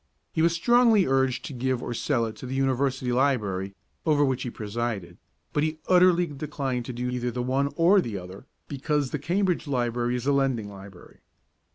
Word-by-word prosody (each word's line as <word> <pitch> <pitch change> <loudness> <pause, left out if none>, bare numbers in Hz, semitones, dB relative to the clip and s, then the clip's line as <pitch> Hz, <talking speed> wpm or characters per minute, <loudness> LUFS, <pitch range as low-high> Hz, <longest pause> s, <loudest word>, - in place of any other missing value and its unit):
He 160 - 0
was 165 +1 +4
strongly 230 +2 +4
urged 130 -1 +1
to - - -6
give 130 0 -1
or - - -3
sell 120 0 0
it 110 -1 -6
to 130 - -8
the 130 - -4
University 135 -1 0
Library 105 -8 0 0.3
over 150 -2 +3
which 130 -2 -1
he 125 - -3
presided, 110 -3 -4 0.3
but 145 - +1
he 155 +1 -1
utterly 180 -1 +5
declined 140 -4 -4
to 125 - -5
do 125 +1 -3
either 125 0 -2
the 120 +1 -3
one 135 +3 0
or 180 +4 +5
the 110 - -4
other, 95 +6 -10 0.2
because 145 -1 -1
the 150 - -2
Cambridge 175 +2 0
Library 120 -2 0
is 125 0 -4
a 140 - +3
lending 130 -7 0
library. 95 -2 -13
130 Hz, 190 wpm, -26 LUFS, 120-150 Hz, 0.3 s, utterly